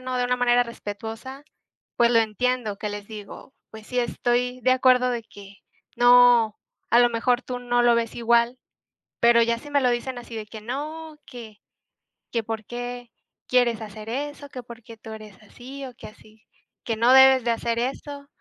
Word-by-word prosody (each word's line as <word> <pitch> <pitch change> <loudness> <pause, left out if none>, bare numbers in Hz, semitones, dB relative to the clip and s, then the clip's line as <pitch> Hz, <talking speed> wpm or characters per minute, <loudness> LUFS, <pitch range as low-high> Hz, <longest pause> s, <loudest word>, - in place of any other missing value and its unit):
¿no?, 255 0 -4
de 250 - 0
una 250 0 0
manera 245 0 +3
respetuosa, 230 +3 -8 0.5
pues, 235 0 +3
lo 230 - +5
entiendo 225 0 -1
que 210 - -4
les 205 0 -7
digo, 215 +4 -10 0.2
pues, 220 0 -11
sí, 250 - -2
estoy 245 +1 -1
de 255 - +2
acuerdo 255 -1 +4
de 235 -2 -3
que 200 -1 -14 0.4
no, 245 -3 +5 0.3
a 235 - +6
lo 240 0 +4
mejor, 245 +2 0
tú 250 0 -5
no 245 0 0
lo 240 -1 +4
ves 230 -1 -2
igual, 235 +1 +2 0.6
pero 235 0 +5
ya 235 0 +1
si 290 - -12
me 285 -1 +2
lo 255 - +2
dicen 245 +1 -2
así 235 -1 -9
de 215 - -5
que 220 +1 -11
no, 305 +7 -6
que 230 -4 -11 0.7
que, 230 -2 -2
"¿Por 220 -1 -5
qué 245 0 -7 0.4
quieres 245 -3 +2
hacer 215 0 -9
eso?, 285 +3 -5
que 255 -2 -8
¿Porque 235 -1 -13
tú 220 0 -10
eres 215 -3 -12
así?, 260 +6 -10
o 255 - -9
que - - -11
así 215 +1 -18 0.4
que 225 -2 -3
no 235 +3 +4
debes 265 -1 +7
de 235 - +2
hacer 230 0 -2
eso", 280 +3 -5
240 Hz, 190 wpm, -24 LUFS, 225-250 Hz, 0.7 s, debes